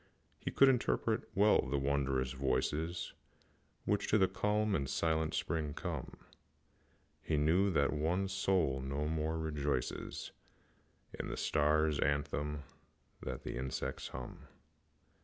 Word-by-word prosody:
He -, -, -3 dB
could 135 Hz, -, +6 dB
interpret 120 Hz, -, +1 dB
well 105 Hz, +2 st, +5 dB
the 70 Hz, +1 st, -2 dB
wondrous 70 Hz, -2 st, 0 dB
voices 70 Hz, +6 st, -1 dB, 0.7 s
Which 105 Hz, -1 st, +1 dB
to 110 Hz, -, +4 dB
the 95 Hz, -2 st, +5 dB
calm 105 Hz, +3 st, +1 dB
and 70 Hz, -7 st, 0 dB
silent 80 Hz, +1 st, +1 dB
spirit 75 Hz, -3 st, -1 dB
come; -, -, -5 dB, 1.0 s
He 80 Hz, -, 0 dB
knew 85 Hz, +7 st, +3 dB
that 70 Hz, -6 st, +2 dB
the -, -, -2 dB
One 90 Hz, +6 st, +1 dB
Soul 95 Hz, -8 st, +1 dB
no 70 Hz, +3 st, -2 dB
more 80 Hz, +1 st, -1 dB
rejoices 75 Hz, -4 st, -2 dB, 0.9 s
In -, -, -2 dB
the -, -, -4 dB
star's 75 Hz, 0 st, +2 dB
anthem 75 Hz, +1 st, 0 dB, 0.6 s
than -, -, -5 dB
the -, -, -4 dB
insect's 65 Hz, +1 st, -3 dB
hum. -, -, -8 dB
75 Hz, 125 wpm, -34 LUFS, 70-90 Hz, 1.0 s, could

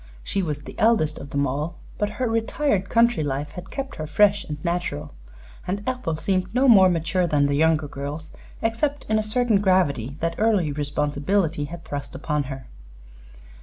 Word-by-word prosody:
She 195 Hz, -, -1 dB
was 150 Hz, -4 st, -3 dB
the -, -, -9 dB
eldest 210 Hz, -9 st, +3 dB
of 140 Hz, -, -9 dB
them 140 Hz, 0 st, 0 dB
all, 150 Hz, +6 st, -3 dB, 0.2 s
but 210 Hz, -, +1 dB
her 255 Hz, -, 0 dB
retired 225 Hz, -2 st, 0 dB
country 235 Hz, -5 st, +3 dB
life 145 Hz, +1 st, -3 dB
had 180 Hz, +1 st, -9 dB
kept 275 Hz, -1 st, -5 dB
her 155 Hz, -, -4 dB
fresh 205 Hz, +5 st, +4 dB
and 150 Hz, -, -5 dB
natural, 170 Hz, -4 st, -2 dB, 0.5 s
and 200 Hz, +3 st, -2 dB
Ethel 250 Hz, -11 st, -2 dB
seemed 185 Hz, +3 st, -1 dB
no 265 Hz, +2 st, +4 dB
more 195 Hz, -6 st, +8 dB
mature 175 Hz, +1 st, +1 dB
than 145 Hz, -3 st, +2 dB
the 140 Hz, -, +1 dB
younger 155 Hz, 0 st, +2 dB
girls 145 Hz, +3 st, -6 dB, 0.3 s
except 275 Hz, +6 st, -1 dB
in 215 Hz, 0 st, +3 dB
a -, -, +2 dB
certain 215 Hz, -1 st, +1 dB
gravity 145 Hz, -, +1 dB
that 165 Hz, 0 st, -1 dB
early 205 Hz, -8 st, +2 dB
responsibility 150 Hz, +3 st, 0 dB
had 170 Hz, +3 st, -9 dB
thrust 140 Hz, -2 st, -6 dB
upon 150 Hz, +1 st, -1 dB
her. 135 Hz, -1 st, -7 dB
170 Hz, 175 wpm, -24 LUFS, 145-210 Hz, 0.5 s, more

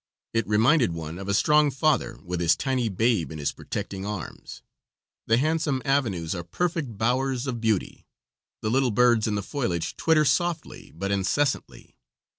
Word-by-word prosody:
It 115 Hz, -2 st, 0 dB
reminded 115 Hz, -, +3 dB
one 80 Hz, +1 st, -6 dB
of 100 Hz, -, -7 dB
a -, -, +1 dB
strong 150 Hz, +5 st, +4 dB
father 135 Hz, -4 st, 0 dB
with 90 Hz, -1 st, -3 dB
his 85 Hz, -1 st, +3 dB
tiny 130 Hz, -4 st, -1 dB
babe 100 Hz, -, +1 dB
in 80 Hz, -, -6 dB
his 75 Hz, -1 st, -1 dB
protecting 95 Hz, -1 st, -5 dB
arms; 105 Hz, -4 st, -7 dB, 0.6 s
the 115 Hz, -, +4 dB
handsome 155 Hz, 0 st, +1 dB
avenues 110 Hz, -, 0 dB
are 85 Hz, -2 st, -4 dB
perfect 140 Hz, -, -2 dB
bowers 125 Hz, +3 st, 0 dB
of 120 Hz, -4 st, -3 dB
beauty; 110 Hz, -4 st, -1 dB, 0.6 s
the 110 Hz, -, 0 dB
little 130 Hz, +1 st, +3 dB
birds 120 Hz, 0 st, +3 dB
in 105 Hz, -, 0 dB
the 100 Hz, -, -2 dB
foliage 90 Hz, -, -2 dB
twitter 155 Hz, -2 st, +3 dB
softly 175 Hz, +1 st, -1 dB
but 100 Hz, +4 st, -3 dB
incessantly. 115 Hz, +9 st, -1 dB
115 Hz, 160 wpm, -25 LUFS, 95-135 Hz, 0.6 s, strong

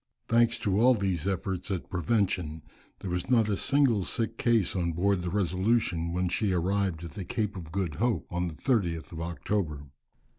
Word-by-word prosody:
Thanks 115 Hz, 0 st, +3 dB
to 100 Hz, 0 st, 0 dB
all 125 Hz, +1 st, +6 dB
these 95 Hz, -4 st, -1 dB
efforts 95 Hz, -1 st, -2 dB
at 95 Hz, -4 st, -3 dB
prevention 90 Hz, -4 st, 0 dB, 0.4 s
there 95 Hz, -, -4 dB
was 90 Hz, +4 st, -2 dB
not 115 Hz, -4 st, +4 dB
a 105 Hz, -, +1 dB
single 130 Hz, -3 st, +3 dB
sick 115 Hz, +3 st, -2 dB
case 115 Hz, -7 st, +2 dB
on 85 Hz, -2 st, 0 dB
board 95 Hz, +2 st, +1 dB
the 90 Hz, -, -3 dB
Resolution 95 Hz, -2 st, +1 dB
when 90 Hz, +1 st, 0 dB
she 95 Hz, +2 st, 0 dB
arrived 90 Hz, -1 st, 0 dB
at 85 Hz, -, -7 dB
the 100 Hz, -, -6 dB
Cape 105 Hz, +3 st, -2 dB
of 85 Hz, -4 st, -8 dB
Good 90 Hz, -3 st, -1 dB
Hope 115 Hz, -, 0 dB
on 90 Hz, 0 st, -1 dB
the 80 Hz, -, -6 dB
30th 85 Hz, -, 0 dB
of 80 Hz, -1 st, -6 dB
October. 85 Hz, -3 st, -2 dB
95 Hz, 185 wpm, -28 LUFS, 85-105 Hz, 0.4 s, all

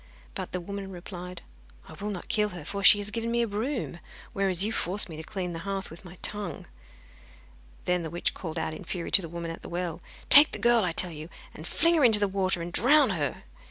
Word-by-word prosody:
But -, -, -6 dB
the 180 Hz, -, -3 dB
woman 195 Hz, +2 st, -7 dB
replied: 180 Hz, 0 st, -9 dB, 0.4 s
'I -, -, -11 dB
will 210 Hz, -, -3 dB
not 190 Hz, -4 st, -6 dB
kill 210 Hz, -1 st, +1 dB
her, 175 Hz, -6 st, -9 dB
for 200 Hz, +4 st, -5 dB
she 205 Hz, -, +9 dB
has 205 Hz, 0 st, -5 dB
given 230 Hz, +1 st, -3 dB
me 235 Hz, 0 st, +1 dB
a -, -, -1 dB
broom, 225 Hz, -2 st, -3 dB, 0.3 s
whereas 195 Hz, -2 st, +2 dB
you 215 Hz, -, -1 dB
forced 195 Hz, -2 st, +1 dB
me 160 Hz, -, -8 dB
to 155 Hz, -, -7 dB
clean 180 Hz, +1 st, -5 dB
the 165 Hz, -, -5 dB
hearth 195 Hz, 0 st, -4 dB
with 165 Hz, -, -12 dB
my 180 Hz, -1 st, -12 dB
tongue.' 205 Hz, -3 st, -1 dB, 1.2 s
Then 180 Hz, 0 st, +1 dB
the 160 Hz, -, -5 dB
witch 175 Hz, +2 st, -1 dB
called 160 Hz, -4 st, -6 dB
out -, -, -2 dB
in 155 Hz, -, -9 dB
fury 175 Hz, -3 st, -5 dB
to 195 Hz, -, +8 dB
the 165 Hz, -, -7 dB
woman 170 Hz, 0 st, -5 dB
at 165 Hz, -, -9 dB
the -, -, -10 dB
well: 175 Hz, -1 st, -4 dB, 0.3 s
'Take 290 Hz, +1 st, +8 dB
the -, -, -1 dB
girl, 235 Hz, -2 st, +3 dB
I 180 Hz, -, 0 dB
tell 175 Hz, +2 st, -1 dB
you, 155 Hz, +1 st, -9 dB, 0.2 s
and 155 Hz, -, -9 dB
fling 335 Hz, -, +2 dB
her 320 Hz, -4 st, +3 dB
into 220 Hz, -4 st, +7 dB
the 205 Hz, -, +2 dB
water, 190 Hz, -2 st, -1 dB
and 170 Hz, +1 st, -7 dB
drown 275 Hz, 0 st, +4 dB
her! 150 Hz, -6 st, -3 dB
190 Hz, 240 wpm, -27 LUFS, 170-210 Hz, 1.2 s, she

